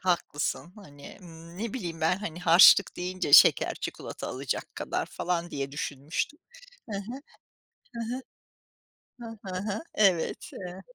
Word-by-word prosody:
Haklısın. 175 Hz, -1 st, -1 dB
Hani, 145 Hz, -8 st, -13 dB
ımm, 170 Hz, -1 st, -13 dB
ne 225 Hz, 0 st, -4 dB
bileyim 170 Hz, -9 st, -5 dB
ben, 160 Hz, +3 st, +2 dB
hani, 175 Hz, -4 st, -6 dB
harçlık 180 Hz, +3 st, +7 dB
deyince 180 Hz, -4 st, -3 dB
şeker, -, -, +7 dB
çikolata -, -, -6 dB
alacak 130 Hz, 0 st, -4 dB
kadar -, -, -3 dB
falan 175 Hz, -1 st, -3 dB
diye 140 Hz, -1 st, -4 dB
düşünmüştüm. 145 Hz, -, -4 dB, 0.5 s
Hı 205 Hz, -, -3 dB
hı. 235 Hz, +7 st, -6 dB, 0.8 s
Hı 230 Hz, +1 st, -3 dB
hı. 260 Hz, -, -7 dB, 1.1 s
Hı 220 Hz, -, -19 dB
hı 185 Hz, -, -4 dB
hı. 205 Hz, +1 st, -3 dB
Evet, 190 Hz, -6 st, +1 dB
eee 180 Hz, 0 st, -8 dB
180 Hz, 135 wpm, -28 LUFS, 160-200 Hz, 1.1 s, harçlık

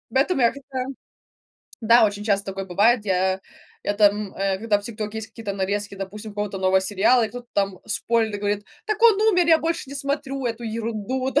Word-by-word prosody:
Поэтому 275 Hz, +1 st, +2 dB
я, 235 Hz, -, +5 dB
как-то, 270 Hz, -2 st, -5 dB, 1.0 s
да, 230 Hz, 0 st, +6 dB
очень 205 Hz, 0 st, -4 dB
часто 200 Hz, -2 st, +1 dB
такое 195 Hz, 0 st, -4 dB
бывает, 210 Hz, +5 st, +3 dB
я 190 Hz, 0 st, +1 dB, 0.4 s
это, 205 Hz, +1 st, +2 dB
м, 205 Hz, -1 st, -1 dB
э, 195 Hz, 0 st, -1 dB
когда 210 Hz, -1 st, +1 dB
в -, -, -18 dB
"Тиктоке" 215 Hz, 0 st, -5 dB
есть 220 Hz, -, -7 dB
какие-то 225 Hz, -4 st, -6 dB
нарезки, 200 Hz, +1 st, -2 dB
допустим, 205 Hz, +3 st, -7 dB
какого-то 205 Hz, -2 st, -3 dB
нового 190 Hz, 0 st, +3 dB
сериала, 205 Hz, +5 st, +3 dB
и -, -, -3 dB
кто-то 245 Hz, 0 st, -9 dB
там 195 Hz, -2 st, 0 dB
спойлерит 225 Hz, -1 st, 0 dB
и -, -, -3 dB
говорит: 205 Hz, 0 st, -1 dB, 0.2 s
"Так 430 Hz, 0 st, -1 dB
он 435 Hz, -3 st, +6 dB
умер, 360 Hz, -6 st, +4 dB
я 325 Hz, -1 st, +6 dB
больше 330 Hz, -4 st, -2 dB
не 280 Hz, -, -7 dB
смотрю 275 Hz, -1 st, -3 dB
эту 235 Hz, 0 st, -4 dB
ерунду", 230 Hz, +3 st, -3 dB
да, 290 Hz, -, +2 dB
215 Hz, 200 wpm, -23 LUFS, 200-255 Hz, 1.0 s, да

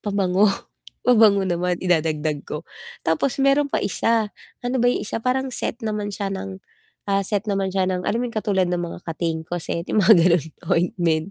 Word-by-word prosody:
pabango, 200 Hz, 0 st, +2 dB, 0.6 s
pabango 215 Hz, -5 st, +5 dB
naman 180 Hz, 0 st, 0 dB
idadagdag 155 Hz, -4 st, +1 dB
ko. 150 Hz, +2 st, -5 dB, 0.4 s
Tapos 160 Hz, -, +1 dB
meron 275 Hz, +1 st, +3 dB
pa -, -, -1 dB
isa, 220 Hz, +1 st, +1 dB, 0.3 s
ano 250 Hz, +2 st, 0 dB
ba 245 Hz, -, +3 dB
'yong 245 Hz, -, 0 dB
isa 220 Hz, -, -3 dB
parang 260 Hz, +2 st, -1 dB
set 240 Hz, -, -3 dB
naman 210 Hz, -1 st, -2 dB
siya 200 Hz, -1 st, -3 dB
ng, 190 Hz, 0 st, -6 dB, 0.5 s
ah, 195 Hz, 0 st, +2 dB
set 205 Hz, +1 st, -1 dB
naman 195 Hz, -1 st, 0 dB
siya 190 Hz, -1 st, +1 dB
ng 185 Hz, -1 st, -1 dB
alam 230 Hz, -, 0 dB
yung 240 Hz, -, -5 dB
katulad 205 Hz, -3 st, +1 dB
ng 175 Hz, 0 st, -1 dB
mga 170 Hz, -1 st, -5 dB
Katingko 165 Hz, 0 st, -3 dB
set 170 Hz, +1 st, -3 dB
yung 215 Hz, -, +4 dB
mga 220 Hz, +3 st, +8 dB
ganon, 170 Hz, -3 st, +3 dB, 0.3 s
ointment. 170 Hz, -1 st, +1 dB
195 Hz, 180 wpm, -22 LUFS, 175-220 Hz, 0.6 s, mga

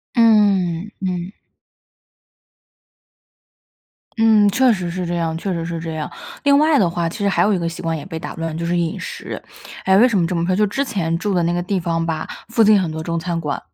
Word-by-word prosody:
嗯， 205 Hz, -5 st, +3 dB
嗯。 180 Hz, 0 st, -3 dB, 2.9 s
嗯， 220 Hz, -2 st, +5 dB
确 255 Hz, +5 st, +3 dB
实 185 Hz, -5 st, -3 dB
是 180 Hz, 0 st, -3 dB
这 175 Hz, -, -2 dB
样 165 Hz, -1 st, -1 dB
确 190 Hz, +3 st, -3 dB
实 165 Hz, -1 st, -3 dB
是 165 Hz, -1 st, -4 dB
这 165 Hz, 0 st, -5 dB
样。 155 Hz, -1 st, -4 dB, 0.3 s
另 280 Hz, 0 st, +5 dB
外 305 Hz, 0 st, +4 dB
的 185 Hz, -, +3 dB
话， 170 Hz, 0 st, -1 dB
其 175 Hz, -, -7 dB
实 205 Hz, -, +1 dB
还 195 Hz, -, +2 dB
有 210 Hz, -, +3 dB
一 -, -, 0 dB
个 170 Hz, -, -2 dB
习 165 Hz, -, -7 dB
惯 165 Hz, -1 st, -2 dB
也 145 Hz, -, -7 dB
被 165 Hz, -4 st, -6 dB
打 -, -, -7 dB
乱， 165 Hz, -1 st, -4 dB
就 170 Hz, -, -3 dB
是 175 Hz, +1 st, 0 dB
饮 170 Hz, -1 st, -1 dB
食。 475 Hz, 0 st, -7 dB, 0.4 s
哎， 190 Hz, 0 st, +4 dB
为 230 Hz, +5 st, +7 dB
什 215 Hz, -6 st, +1 dB
么 170 Hz, -, +2 dB
这 180 Hz, +1 st, -2 dB
么 165 Hz, -, 0 dB
说， 185 Hz, +1 st, +1 dB
就 210 Hz, +3 st, +3 dB
之 270 Hz, +8 st, -1 dB
前 185 Hz, -10 st, -1 dB
住 205 Hz, +2 st, -2 dB
的 180 Hz, -2 st, +2 dB
那 170 Hz, -, +1 dB
个 175 Hz, 0 st, -1 dB
地 190 Hz, +1 st, -1 dB
方 165 Hz, -1 st, -1 dB
吧， 160 Hz, -1 st, -3 dB, 0.2 s
附 230 Hz, 0 st, +2 dB
近 215 Hz, -1 st, +6 dB
很 170 Hz, -4 st, -2 dB
多 160 Hz, 0 st, -5 dB
中 170 Hz, +1 st, -2 dB
餐 170 Hz, 0 st, -3 dB
馆， 150 Hz, -3 st, -3 dB
175 Hz, 250 characters per minute, -20 LUFS, 165-210 Hz, 2.9 s, 为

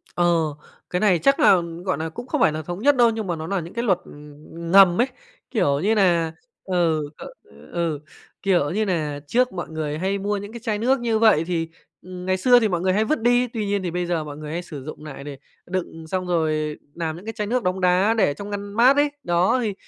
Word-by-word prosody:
Ờ, 175 Hz, 0 st, +3 dB, 0.6 s
cái 180 Hz, -, -1 dB
này 190 Hz, -6 st, +3 dB
chắc 275 Hz, +2 st, +3 dB
là, 190 Hz, -11 st, +6 dB, 0.2 s
gọi 185 Hz, -, 0 dB
nà, 160 Hz, +1 st, -3 dB
cũng 240 Hz, +10 st, -9 dB
không -, -, -1 dB
phải -, -, +5 dB
là 155 Hz, +1 st, -4 dB
thống 175 Hz, +4 st, -6 dB
nhất 285 Hz, +3 st, +4 dB
đâu, 240 Hz, -2 st, +5 dB
nhưng 220 Hz, -3 st, -3 dB
mà 170 Hz, -, -1 dB
nó 160 Hz, 0 st, -6 dB
nà 195 Hz, 0 st, -1 dB
những 170 Hz, 0 st, -8 dB
cái 235 Hz, +1 st, -2 dB
luật, 190 Hz, -6 st, +3 dB
ừm, 150 Hz, +3 st, -10 dB
ngầm 195 Hz, 0 st, +7 dB
ấy, 250 Hz, -, +2 dB, 0.4 s
kiểu 145 Hz, -, +1 dB
như 210 Hz, +7 st, +2 dB
nà 170 Hz, -5 st, +2 dB, 0.3 s
ừ, 165 Hz, -5 st, 0 dB, 0.6 s
ừ, 165 Hz, -4 st, -1 dB, 0.4 s
kiểu 175 Hz, -7 st, +2 dB
như 215 Hz, +4 st, 0 dB
nà, 155 Hz, -6 st, -2 dB
trước 250 Hz, +6 st, +2 dB
mọi 175 Hz, -2 st, -5 dB
người 155 Hz, -1 st, -3 dB
hay 190 Hz, +3 st, -1 dB
mua 205 Hz, +1 st, -1 dB
những 205 Hz, +1 st, -7 dB
cái 235 Hz, -, -7 dB
chai 215 Hz, -2 st, -2 dB
nước 255 Hz, +3 st, +2 dB
như 230 Hz, -2 st, 0 dB
vậy 215 Hz, -9 st, +5 dB
thì, 165 Hz, -2 st, -2 dB, 0.3 s
ừm, 180 Hz, 0 st, -9 dB
ngày 185 Hz, 0 st, +1 dB
xưa 245 Hz, +6 st, +5 dB
thì 225 Hz, -, +2 dB
mọi 175 Hz, -3 st, -1 dB
người 185 Hz, 0 st, +2 dB
hay 215 Hz, +3 st, +2 dB
vứt 305 Hz, -3 st, 0 dB
đi, 245 Hz, +1 st, +3 dB
tuy 225 Hz, -2 st, -4 dB
nhiên 200 Hz, -1 st, -1 dB
thì 175 Hz, -, -2 dB
bây 180 Hz, 0 st, -2 dB
giờ 170 Hz, -2 st, -1 dB
mọi 145 Hz, -1 st, -8 dB
người 150 Hz, 0 st, -7 dB
hay 170 Hz, +2 st, -3 dB
sử 145 Hz, -6 st, -9 dB
dụng 155 Hz, 0 st, -9 dB
nại 140 Hz, -2 st, -8 dB
để 145 Hz, -1 st, -8 dB, 0.3 s
đựng 170 Hz, -3 st, -5 dB
xong 185 Hz, +2 st, -2 dB
rồi 155 Hz, -3 st, 0 dB, 0.2 s
làm 160 Hz, -2 st, -3 dB
những 180 Hz, +5 st, -12 dB
cái 225 Hz, -, -5 dB
chai 210 Hz, -1 st, -3 dB
nước 245 Hz, 0 st, 0 dB
đông 185 Hz, +1 st, -1 dB
đá 185 Hz, +4 st, +3 dB
để 145 Hz, -, +3 dB
trong 200 Hz, +7 st, -8 dB
ngăn 205 Hz, 0 st, -5 dB
mát 245 Hz, +5 st, +5 dB
ấy. 290 Hz, 0 st, +2 dB
Đó, 175 Hz, +8 st, +2 dB
thì 215 Hz, -3 st, -1 dB
180 Hz, 250 wpm, -23 LUFS, 160-215 Hz, 0.6 s, ngầm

